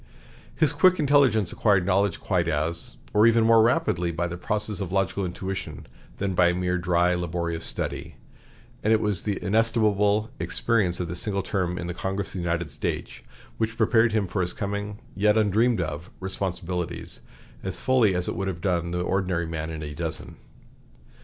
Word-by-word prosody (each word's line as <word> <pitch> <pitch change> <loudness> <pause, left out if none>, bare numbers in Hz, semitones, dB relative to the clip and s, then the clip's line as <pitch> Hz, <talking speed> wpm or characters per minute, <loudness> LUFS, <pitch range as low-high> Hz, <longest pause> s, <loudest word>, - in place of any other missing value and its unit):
His - - +2
quick 185 -1 +5
intelligence 135 - +3
acquired 100 -5 +2
knowledge 100 +1 +1
quite 90 -4 0
as, 85 +2 -2 0.2
or 105 +2 +6
even 115 0 +4
more, 115 0 +6
rapidly 110 - +2
by 85 +1 -1
process 105 +4 -2
of 95 -3 -4
logical 95 0 0
intuition 90 -5 -5 0.3
than 100 -1 -1
by 90 -1 +4
mere 90 0 0
dry, 90 0 +2
laborious 85 -1 -2
study; - - -4 0.7
and 110 - +2
it 110 - +5
was 105 -3 0
the 105 -2 -2
inestimable 110 0 +2
experience 105 -7 0
of 90 - -2
this 90 +1 -4
single 100 -3 -1
term 90 -3 -1
in 85 - -4
the 85 - -3
Congress 95 +2 -3
of - - -10
the 95 - -4
United 85 -3 -2
States - - -4 0.4
which 115 0 -1
prepared 115 +1 +4
him 105 -2 +1
for 95 +2 -2
his 90 0 -1
coming, 100 +1 -4 0.2
yet 105 +2 +3
undreamed 110 +2 +3
of, 80 0 -4
responsibilities, 90 -3 -4 0.4
as - - -5
fully 125 -7 +3
as 90 0 -1
it - - -2
would 95 - -2
have 90 -3 -3
done 85 -1 0
the 90 0 -2
ordinary 90 -2 0
man 80 -1 -4
in 80 -1 -5
a 75 -1 -6
dozen. 80 +1 -5
95 Hz, 175 wpm, -25 LUFS, 85-105 Hz, 0.7 s, or